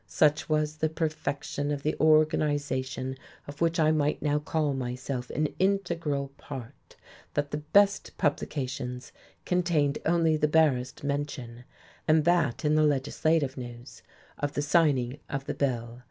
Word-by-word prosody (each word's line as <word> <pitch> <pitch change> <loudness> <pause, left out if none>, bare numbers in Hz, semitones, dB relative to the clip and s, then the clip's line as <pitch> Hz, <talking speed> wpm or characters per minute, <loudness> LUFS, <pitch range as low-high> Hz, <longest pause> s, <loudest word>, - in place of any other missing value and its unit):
Such 150 0 +2
was 155 0 0
the 155 +1 +1
perfection 155 -3 -2
of 145 -1 -2
the 155 - 0
organization 145 -4 +1 0.3
of 145 +2 -10
which 165 0 +2
I 155 -1 +4
might 150 -1 +1
now 150 -1 +1
call 150 -1 0
myself 125 0 -4
an 150 0 0
integral 170 -8 0
part 130 -2 -10 0.4
that 145 -1 -1
the 150 - -1
"best" 200 +7 +2
publications 130 -5 -2 0.3
contained 170 -6 +1
only 165 -1 +3
the 150 0 +2
barest 150 -6 +2
mention, 140 -4 -4 0.4
and 155 -1 +4
that 170 -5 +2
in 150 - +3
the 155 - +4
legislative 145 0 +1
news, 120 -1 -9 0.4
of 145 0 -2
the 145 - -1
signing 145 -4 +2
of 135 -1 -3
the - - -2
bill. 120 -3 -2
145 Hz, 140 wpm, -28 LUFS, 130-155 Hz, 0.4 s, I